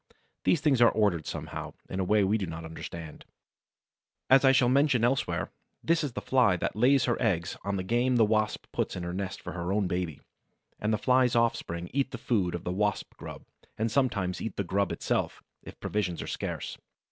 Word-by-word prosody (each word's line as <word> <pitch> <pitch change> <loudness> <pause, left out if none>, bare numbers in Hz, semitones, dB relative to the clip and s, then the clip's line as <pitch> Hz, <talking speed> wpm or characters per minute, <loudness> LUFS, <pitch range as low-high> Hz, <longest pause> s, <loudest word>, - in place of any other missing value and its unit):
These 165 - +3
things 140 -5 +3
are 120 - +8
ordered 100 -7 +1
somehow, - - -5
in 95 - -4
a - - +1
way 105 +2 +3
we 105 +3 +2
do 95 - -3
not 80 0 -6
understand. 80 -1 -8 1.1
As 135 +1 +7
I 135 - +7
shall 130 -2 +4
mention 135 -2 +3
elsewhere, 120 -10 0 0.3
this 165 -1 +2
is 140 -5 -3
the - - -4
Fly 125 -8 +3
that - - -2
lays 125 +3 +4
her 120 - 0
eggs 95 -6 0
on 100 0 -1
the 95 - -2
game 120 +5 +1
the 115 -2 +5
Wasp 110 0 0
puts - - -2
in 90 - -4
the 85 0 -4
nest 95 0 -4
for - - -6
her 85 +1 -3
own 100 0 +1
baby; 90 -4 -2 0.6
and 105 - 0
the 110 - +2
Fly's 125 +2 +3
offspring 90 -7 0
eat 135 0 +1
the 125 - -6
food 100 -7 0
of 85 - -6
the 90 - -2
Wasp 105 +1 -1
grub, - - -9 0.3
and 110 +1 0
sometimes 105 -9 0
eat 110 - -4
the 100 - -1
grub 100 +1 0
itself, - - -2 0.2
if - - -12
provisions 95 -5 -2
are - - -7
scarce. - - -4
105 Hz, 205 wpm, -29 LUFS, 90-125 Hz, 1.1 s, are